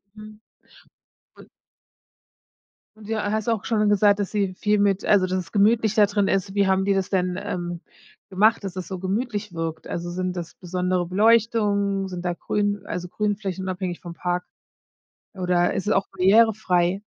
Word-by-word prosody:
Mhm. 215 0 -12 1.0
Un - - -15 1.5
Du 220 +1 -5
hast 215 +1 -2
auch 225 -3 0
schon 215 -2 +1
gesagt, 205 0 +4
dass 200 - -2
sie 200 -3 -1
viel 210 +1 +1
mit 200 -1 +1
also, 195 -3 +4
dass 185 0 -1
es 185 - -6
gemütlich 215 +1 +3
da 210 -1 +6
drin 200 -1 0
ist. 195 0 0
Wie 200 -1 +3
haben 190 0 +2
die 200 - +2
das 195 -1 -1
denn, 180 -2 0
ähm, 175 -3 -4 0.5
gemacht, 215 +4 +3
dass 195 -2 -5
das 185 -2 -6
so 185 0 -5
gemütlich 205 +1 -3
wirkt? 165 -1 -5
Also, 175 0 -4
sind 185 +1 -3
das 170 -2 -6
besondere 180 0 -1
Beleuchtung, 205 -1 +2
sind 180 -1 -7
da 175 - 0
grün 205 +2 -2
also, 180 0 -4
Grünflächen 200 -2 -3
unabhängig 185 -1 -4
vom 175 -2 -8
Park 180 +1 -2 0.9
oder 180 -2 +1
ist 195 - -3
es - - +3
auch 195 - +1
barrierefrei? 195 -2 +3
195 Hz, 170 wpm, -23 LUFS, 180-210 Hz, 1.5 s, da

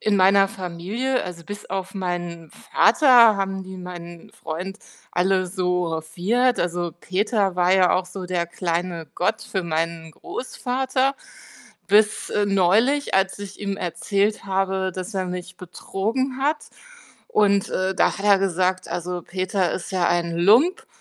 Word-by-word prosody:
in 210 -1 +1
meiner 195 +1 +5
Familie 195 +8 -3
also, 175 -2 -8
bis 205 +4 -8
auf 190 0 -4
meinen 175 -3 -4
Vater 245 -8 +5
haben 195 -1 -2
die 190 0 -9
meinen 175 -2 -9
Freund 180 +5 -6 0.3
alle 185 +1 +1
so 180 -2 -1
hofiert. 185 +11 0
Also, 175 -1 -2
Peter 195 -1 0
war 180 +1 +4
ja 185 -2 +4
auch 185 0 0
so 185 0 -7
der 180 -1 -1
kleine 170 -1 -3
Gott 180 - 0
für 190 -2 -3
meinen 165 0 -2
Großvater. 260 - -2 0.7
Bis 210 +1 +3
neulich, 210 +9 +2
als 195 +1 0
ich 200 -1 -8
ihm 200 -1 -3
erzählt 200 +5 -1
habe, 190 -1 0
dass 185 +3 -6
er 190 -1 -1
mich 180 0 -6
betrogen 220 +9 -3
hat. 300 +2 +1 0.7
Und, 200 -2 +2
äh, 190 0 0
da - - +2
hat 195 - -6
er 200 -1 +6
gesagt: 185 -1 0
„Also 180 0 -4
Peter 185 0 -1
ist 185 - -5
ja 180 -2 +1
ein 170 -1 0
Lump“, 225 - +4
190 Hz, 145 wpm, -23 LUFS, 175-205 Hz, 0.7 s, er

